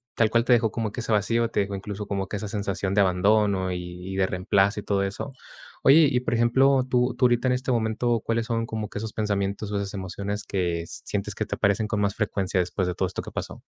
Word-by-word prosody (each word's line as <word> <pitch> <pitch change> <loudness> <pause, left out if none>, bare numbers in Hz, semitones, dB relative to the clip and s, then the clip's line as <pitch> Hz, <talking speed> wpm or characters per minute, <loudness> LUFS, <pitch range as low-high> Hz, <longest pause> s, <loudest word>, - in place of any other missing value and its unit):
tal 110 -2 +3
cual, 115 0 +3
te 125 - +5
dejó 115 -2 +3
como 115 -3 -2
que, 120 - -5
ese 115 - -4
vacío, 115 +3 +2
te - - +1
dejó, 100 0 -3
incluso, 100 +1 -6
como 100 -2 -2
que 100 - -4
esa 105 - -5
sensación 100 -2 -2
de 100 - +5
abandono, 95 0 +2
y 90 +1 -6
y - - -4
de 95 -1 +2
reemplazo 95 +3 +1
y - - -16
todo 100 -1 0
eso. 105 +8 -4 0.5
Oye, 145 +2 +7
y 125 - +2
por 125 - -2
ejemplo, 130 +3 +4
tú 125 0 +2
tú 125 - +3
ahorita 120 +1 +3
en 125 - +3
este 130 +1 -1
momento, 115 0 +1
¿cuáles 115 0 0
son 115 -1 -1
como 110 -2 -4
que - - -7
esos 110 0 -5
pensamientos, 100 -1 -2
o 105 - -1
esas 100 -1 -3
emociones 100 +2 -4
que, 85 -3 -1
sientes - - -4
que - - -2
te - - -3
aparecen 100 +1 +1
con 105 -2 -1
más 100 0 0
frecuencia 100 -3 -1
después 90 +1 -1
de 90 - -2
todo - - 0
esto - - -5
que - - -9
pasó? - - -6
105 Hz, 250 wpm, -25 LUFS, 100-115 Hz, 0.5 s, Oye